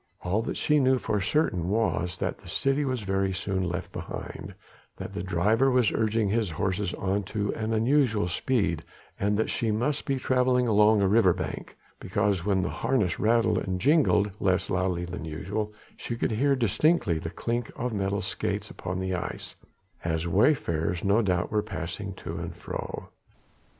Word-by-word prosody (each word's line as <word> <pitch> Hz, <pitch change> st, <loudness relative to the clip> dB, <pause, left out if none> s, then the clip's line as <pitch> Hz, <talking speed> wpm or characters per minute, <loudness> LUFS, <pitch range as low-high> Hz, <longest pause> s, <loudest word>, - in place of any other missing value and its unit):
All 95 Hz, +5 st, +1 dB
that 115 Hz, -, -4 dB
she 150 Hz, 0 st, +3 dB
knew 130 Hz, -1 st, +4 dB
for 105 Hz, -4 st, -1 dB
certain 90 Hz, -, +1 dB
was 100 Hz, -5 st, 0 dB
that -, -, -3 dB
the -, -, -13 dB
city 135 Hz, +2 st, +1 dB
was 130 Hz, -3 st, -1 dB
very 95 Hz, -1 st, 0 dB
soon 95 Hz, -1 st, -1 dB
left 90 Hz, -, -4 dB
behind, -, -, -7 dB, 0.4 s
that -, -, -7 dB
the -, -, -3 dB
driver 100 Hz, +8 st, +2 dB
was 125 Hz, -4 st, +3 dB
urging 110 Hz, -1 st, +1 dB
his 110 Hz, 0 st, +1 dB
horses 95 Hz, +3 st, -1 dB
on 95 Hz, +2 st, 0 dB
to 105 Hz, +1 st, -2 dB
unusual 115 Hz, -1 st, +1 dB
speed, 90 Hz, -4 st, 0 dB, 0.4 s
and 100 Hz, +1 st, +1 dB
that 110 Hz, -, 0 dB
she 115 Hz, -, -1 dB
must 125 Hz, +8 st, 0 dB
be 135 Hz, -1 st, +1 dB
travelling 125 Hz, -1 st, +2 dB
along 105 Hz, -1 st, +5 dB
a -, -, +4 dB
river 100 Hz, -3 st, +5 dB
bank, 90 Hz, -, -6 dB, 0.2 s
because 100 Hz, -5 st, 0 dB
when 95 Hz, -2 st, +1 dB
the -, -, -1 dB
harness 115 Hz, -10 st, 0 dB
rattled 115 Hz, +1 st, +3 dB
and 95 Hz, -1 st, -3 dB
jingled 135 Hz, -, +3 dB
less 95 Hz, 0 st, +1 dB
loudly 90 Hz, -2 st, 0 dB
than 90 Hz, 0 st, -6 dB
usual, 100 Hz, +7 st, -3 dB, 0.3 s
she 120 Hz, -, -4 dB
could 115 Hz, -, -1 dB
hear 135 Hz, +6 st, +2 dB
distinctly 115 Hz, -, +2 dB
the 80 Hz, -, -5 dB
clink 115 Hz, +7 st, -3 dB
of 125 Hz, 0 st, -3 dB
metal 100 Hz, -1 st, -1 dB
skates 95 Hz, -, -2 dB
upon 90 Hz, +1 st, -4 dB
the 95 Hz, 0 st, -2 dB
ice, 90 Hz, -, -4 dB, 0.5 s
as 80 Hz, 0 st, -1 dB
wayfarers 85 Hz, -, +1 dB
no 100 Hz, +4 st, +3 dB
doubt 90 Hz, -4 st, 0 dB
were 105 Hz, 0 st, +2 dB
passing 95 Hz, +2 st, -5 dB
to -, -, -6 dB
and -, -, -5 dB
fro. -, -, -6 dB
105 Hz, 170 wpm, -27 LUFS, 90-115 Hz, 0.5 s, along